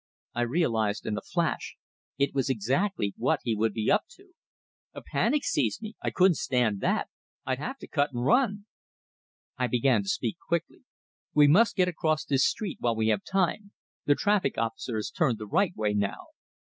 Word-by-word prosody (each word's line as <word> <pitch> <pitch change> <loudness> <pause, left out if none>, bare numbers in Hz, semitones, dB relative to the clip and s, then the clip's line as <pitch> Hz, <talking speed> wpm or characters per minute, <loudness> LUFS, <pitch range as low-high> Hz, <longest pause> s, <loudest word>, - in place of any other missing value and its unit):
I 120 - -1
realized 115 -6 0
in 105 - -1
a - - -4
flash 170 -2 -2 0.4
it 140 0 +1
was 135 0 0
exactly 130 - 0
what - - +1
he 115 - 0
would 110 +1 +1
be 110 +1 0
up 210 - +3
to! 390 -1 -21 0.6
A - - -8
panic 295 -1 0
seized 120 -7 0
me; 215 0 -6
I - - -1
couldn't 185 -3 +3
stand 120 -6 0
that; - - 0 0.4
I'd 130 0 -1
have 265 - -4
to - - -11
cut 145 -1 0
and 120 -1 -3
run! 205 - +2 0.9
I 125 - +2
began 125 - +2
to 195 - -5
speak 200 -3 -1
quickly. 170 +9 -3 0.5
"We 150 -1 +7
must 205 +10 +5
get 185 -2 +3
across 155 -3 0
this 135 -2 +2
street 215 -4 -1
while 120 -1 0
we 110 0 +1
have 105 -2 +1
time; 195 +2 -1 0.3
the 145 - +4
traffic 205 -8 +1
officer 115 +1 -2
has 110 - -3
turned 135 -10 +1
the 105 - -7
right 180 - +1
way 105 -1 0
now." 100 -1 -2
140 Hz, 190 wpm, -28 LUFS, 115-190 Hz, 0.9 s, We